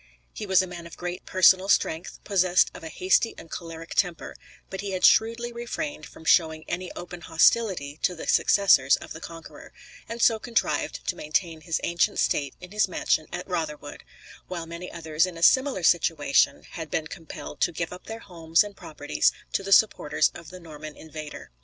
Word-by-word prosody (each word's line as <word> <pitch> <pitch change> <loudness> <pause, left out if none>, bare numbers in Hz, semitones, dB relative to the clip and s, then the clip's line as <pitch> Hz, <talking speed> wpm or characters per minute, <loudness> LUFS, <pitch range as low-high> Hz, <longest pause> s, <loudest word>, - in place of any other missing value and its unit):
He 210 - -6
was 190 -1 +4
a - - -5
man 175 -1 -8
of 170 - -13
great 175 0 -6
personal 185 +1 +5
strength, 165 -1 +1
possessed 185 -3 +3
of - - -11
a 160 - -6
hasty 185 +7 +1
and 165 - -12
choleric 165 -1 -7
temper, 175 -4 -1 0.3
but 190 - -6
he 200 -1 -4
had 185 - +2
shrewdly 230 +2 +3
refrained 240 +6 -5
from 160 - -15
showing 160 -1 +3
any 180 +1 -4
open 175 0 -8
hostility 165 -4 +2
to 180 - +1
the 165 - -7
successors 140 -9 +4
of - - -9
the 160 - -10
Conqueror; 165 0 -11 0.4
and 230 +1 -5
so 225 -1 +4
contrived 235 +1 -1
to - - 0
maintain 160 +1 -2
his 165 -1 -2
ancient 170 0 +1
state 140 -3 0
in 180 0 -11
his 210 0 +2
mansion 155 -3 0
at - - -6
Rotherwood, 155 -5 -4 0.4
while 175 -2 -5
many 170 +2 -8
others 160 0 0
in 175 -2 -8
a 165 - -5
similar 260 -3 +4
situation 155 -4 +3
had 160 -2 -7
been 155 - -1
compelled 160 -3 -9
to - - +3
give 170 +1 -4
up 180 - -11
their 225 +1 -7
homes 165 -2 +1
and 205 -1 -9
properties 75 - 0 0.2
to - - +1
the 195 0 -6
supporters 150 -8 +4
of 170 -2 -11
the 185 - -10
Norman 155 -2 -10
invader. 155 -1 -9
175 Hz, 190 wpm, -26 LUFS, 160-190 Hz, 0.4 s, personal